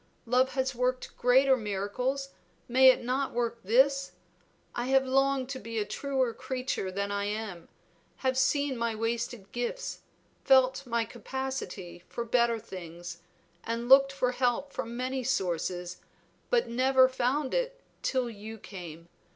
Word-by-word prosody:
Love 255 +2 +2
has 265 0 0
worked 250 +1 -1
greater 265 +2 +5
miracles, 245 +6 -2 0.4
may 260 +2 +6
it 255 - +3
not 260 +3 -1
work 235 -1 -1
this? 275 +6 +3 0.6
I 240 +1 -2
have 265 0 +4
longed 270 0 +2
to 265 -1 -4
be 230 0 -6
a 210 - +1
truer 265 -1 -1
creature 255 -7 -3
than 200 +2 -2
I 200 0 -1
am; 205 -5 -5 0.6
have 260 0 +3
seen 275 0 +2
my 230 -1 0
wasted 225 -2 -3
gifts, 245 - -3 0.4
felt 265 0 +4
my 235 -1 0
capacity 260 -9 -5
for 235 - -4
better 235 0 +2
things, 175 -4 -8 0.4
and 230 +1 -3
looked 275 +1 +7
for 265 -2 0
help 250 +2 0
from 235 +1 -4
many 255 +1 -2
sources, 180 -5 -1 0.5
but 485 -1 +2
never 260 +2 +4
found 260 +2 0
it - - -1 0.2
till 255 -2 0
you 220 0 -8
came. 170 -5 -9
250 Hz, 145 wpm, -29 LUFS, 220-265 Hz, 0.6 s, looked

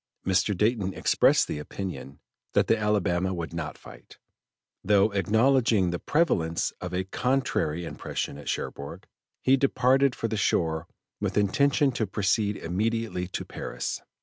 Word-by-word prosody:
Mr. 95 +1 +2
Dayton 105 -2 +1
expressed - - +3
the - - -4
opinion 75 -3 -6 0.3
that - - +3
the - - +3
Alabama 95 -4 0
would 85 -1 -5
not 80 -2 -4
fight, - - -14 0.7
though 100 +1 +4
acknowledging 110 -1 +3
the 85 - -3
prevalence 85 - +1
of 90 - -5
a 90 +1 -1
contrary 95 - -1
impression 70 - -4
at 75 - -7
Cherbourg; 70 0 -5 0.4
he 130 - +5
departed 135 0 +3
for 115 - -2
the 110 -1 -2
shore 80 -6 0 0.3
with - - -2
intention 140 +7 +3
to 115 -3 -2
proceed 100 +1 0
immediately 105 +1 -2
to 95 - -5
Paris. - - -5
100 Hz, 140 wpm, -27 LUFS, 90-115 Hz, 0.7 s, he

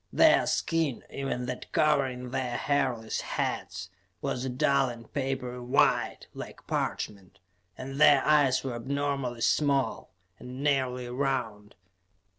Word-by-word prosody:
Their - - +5
skin, 160 -6 0
even 135 -2 -3
that 125 0 -6
covering 135 -5 +1
their 130 -2 -2
hairless 130 -6 0
heads, 85 +2 -3 0.3
was 125 - -2
a 130 - -2
dull 135 +1 +2
and 115 -1 -10
papery 130 -3 -2
white, 125 +3 +2
like - - -9
parchment, 100 -2 -3 0.4
and 135 +2 -5
their 145 -3 +7
eyes 145 -4 +4
were 130 -2 -3
abnormally 135 -1 -2
small, 140 +1 +1 0.3
and 130 +2 -7
nearly 130 -3 +1
round. 120 -5 -2
130 Hz, 120 wpm, -28 LUFS, 125-140 Hz, 0.4 s, their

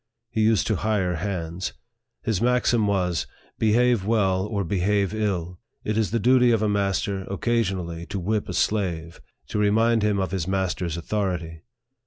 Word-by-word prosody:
He 110 - 0
used 110 -1 +3
to 110 - 0
hire 95 -4 0
hands. 90 -1 -3 0.5
His 110 -5 0
maxim 120 -2 +2
was, 90 -4 0 0.3
Behave 115 0 +3
well 95 -3 +1
or 105 -2 -1
behave 100 +2 +1
ill, 90 -5 -2 0.2
it 110 - -1
is 110 -3 +1
the 115 - 0
duty 125 +2 +4
of 115 -2 +2
a - - +2
master 100 -1 0
occasionally 95 -6 -1
to 100 -1 -4
whip 105 +3 -1
a - - -3
slave, 85 -6 -1 0.3
to 105 - -1
remind 110 +2 +3
him 105 -1 +2
of 95 - -1
his 95 -3 -2
master's 95 -3 -1
authority. 85 -3 -3
100 Hz, 160 wpm, -24 LUFS, 90-110 Hz, 0.5 s, duty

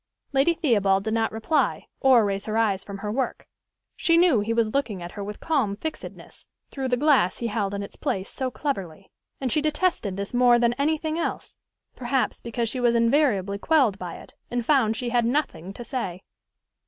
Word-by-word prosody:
Lady 275 +5 +3
Theobald 205 - +2
did 220 0 -2
not 225 -1 +1
reply, 225 +8 0
or 255 -5 +5
raise 200 0 -2
her 215 +1 -1
eyes 205 -4 +1
from 200 -1 -7
her 210 +1 -4
work: 255 +3 -2 0.5
she 335 -1 +3
knew 340 -9 +5
he 210 +2 -2
was 230 -1 +1
looking 240 -9 -1
at 175 0 -7
her 205 - -6
with 210 +1 -7
calm 265 -11 0
fixedness, 315 +9 -8 0.2
through 270 -2 -3
the 250 -1 +1
glass 275 - +3
he 235 - -5
held 205 -3 -1
in 200 - -3
its 200 - -10
place 190 0 -2
so 260 -1 -3
cleverly; 195 - -5 0.3
and 260 -3 -2
she 305 - +2
detested 300 - 0
this 200 +3 -4
more 245 -1 +5
than 240 0 +2
any 290 +5 +1
thing 315 +1 -3
else, - - -4 0.4
perhaps 255 +1 -1
because 235 0 -2
she 255 +3 -3
was 240 -1 +3
invariably 230 -5 +2
quelled 255 - +2
by 175 -2 -6
it, - - -13 0.2
and 240 -1 -2
found 240 -6 +3
she 245 +1 -3
had 240 0 +2
nothing 230 - -1
to 240 - -8
say. 200 -7 -4
235 Hz, 200 wpm, -25 LUFS, 200-275 Hz, 0.5 s, or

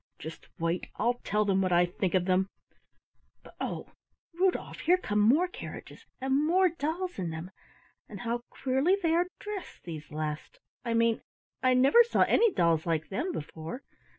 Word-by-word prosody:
Just 160 +2 -9
wait, 165 +2 -1
I'll 240 +2 0
tell 210 +1 +1
them 195 -1 +2
what 185 -1 +1
I 175 0 +5
think 180 +1 -2
of 180 -1 +2
them; 185 +1 +2 1.0
but, - - -15
oh, - - -4 0.4
Rudolf, 365 +2 0
here 355 +3 +4
come 210 - -1
more 270 +13 +5
carriages 360 - -9
and 265 +2 +1
more 365 +4 +4
dolls 335 - -3
in 175 -3 -2
them, 160 +3 -6 0.6
and 200 -2 -8
how 235 0 -2
queerly 270 +9 +1
they 325 -1 +3
are 350 +2 +3
dressed, 415 -2 -7
these 155 -3 -7
last, 155 0 -4 0.3
I 235 -1 -1
mean! 230 0 +2 0.4
I 255 -1 +4
never 275 - +7
saw 470 - 0
any 460 -2 +4
dolls 170 - +2
like 160 -2 0
them 310 - -2
before. 160 - -6
230 Hz, 170 wpm, -29 LUFS, -, 1.0 s, never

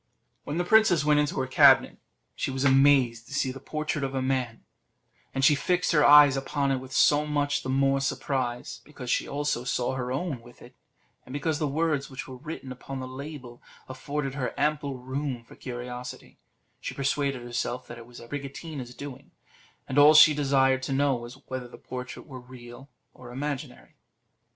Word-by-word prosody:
When 145 - -3
the 175 - +1
princess 215 -7 +4
went 150 0 +4
into 150 -1 0
her - - -1
cabinet, 130 - +5 0.3
she - - -3
was 135 0 -2
amazed 135 -4 +4
to 140 - -7
see 130 -2 0
the 135 - -9
portrait 155 +1 -3
of 135 0 -3
a - - 0
man; 130 -3 -2 0.7
and 135 0 +1
she 150 - +7
fixed 180 +5 0
her 150 -3 +4
eyes 145 -1 +8
upon 140 +1 -1
it 135 - +1
with 130 0 -11
so 150 +3 +3
much 145 -1 0
the - - -6
more 135 +1 +2
surprise, 130 -3 -3
because 130 -4 -7
she - - 0
also 145 -3 -2
saw 125 0 -1
her 125 -1 -3
own 135 -2 -3
with 120 +1 -17
it, 125 - -15 0.5
and 130 - -11
because 145 +2 -1
the 155 - 0
words 150 -1 -1
which 130 -1 -7
were 130 - -9
written 145 -1 -8
upon 130 +1 -7
the 130 - -5
label 130 -2 -9 0.3
afforded 135 +1 -4
her 135 -3 -4
ample 145 -2 0
room 130 0 -4
for - - -16
curiosity 125 - -8 0.4
She - - -6
persuaded 140 -2 -1
herself 120 +1 -3
that 120 0 -10
it 115 - -12
was 120 0 -13
Abricotina's 140 0 -7
doing; 140 -1 -9 0.6
and 130 - +1
all 150 +2 +8
she 155 0 +9
desired 135 -2 +2
to 135 +1 -3
know 140 0 +2
was, 120 0 -6
whether 130 -1 -5
the 120 - -13
portrait 125 -1 -8
were 130 -2 -9
real 125 +1 -12 0.2
or 125 -1 -12
imaginary. 140 0 -5
135 Hz, 185 wpm, -27 LUFS, 125-145 Hz, 0.7 s, she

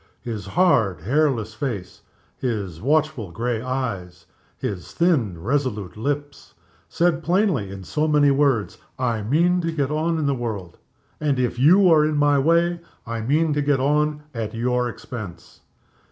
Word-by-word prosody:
His 110 -5 -5
hard, 110 - +2
hairless 120 - +1
face, 110 -8 -5 0.3
his 100 -10 -3
watchful 150 - +1
gray 115 +5 -2
eyes, 100 -10 -4 0.3
his 95 -3 -5
thin, 130 - +1
resolute 110 - -2
lips, 145 +5 -4 0.3
said 170 -1 +1
plainly, 175 - +1
in 95 0 -8
so 150 - -1
many 145 -2 +4
words, 135 -9 +1 0.2
"I 120 -4 -1
mean 170 - +2
to 165 -1 -1
get 145 -3 -1
on 160 +2 0
in 155 - -1
the 140 - +2
world; 110 -9 -5 0.4
and, 145 -3 0
if 125 -1 -1
you 180 +8 +6
are 155 -2 +6
in 155 0 0
my 145 -1 +4
way, 170 +4 +2 0.3
I 115 0 -4
mean 150 +7 +1
to 145 - 0
get 145 -2 +2
on 150 +2 +1
at 115 -2 -4
your 125 +1 0
expense." 105 -8 -9
130 Hz, 155 wpm, -23 LUFS, 110-150 Hz, 0.4 s, you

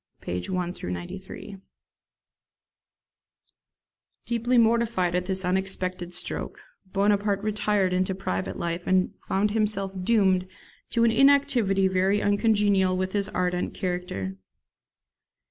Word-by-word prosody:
pp. 90 0 -4
1 180 -1 -2 0.2
93.] 185 - -7 2.7
Deeply 240 +1 +1
mortified 225 -6 +2
at 180 0 -1
this 190 -1 -1
unexpected 185 -1 -2
stroke, 175 - -3 0.3
Bonaparte 200 0 +1
retired 210 -3 +1
into 185 +1 0
private 95 - -3
life, 170 +1 -3
and 185 0 +2
found 205 +2 +1
himself 210 -3 0
doomed 190 -4 +3 0.4
to 230 - +1
an 230 - +4
inactivity 260 -8 +4
very 190 +2 +2
uncongenial 205 -3 +2
with 185 0 -2
his 200 -1 0
ardent 180 -1 -1
character. 180 - -3
190 Hz, 105 wpm, -26 LUFS, 180-210 Hz, 2.7 s, an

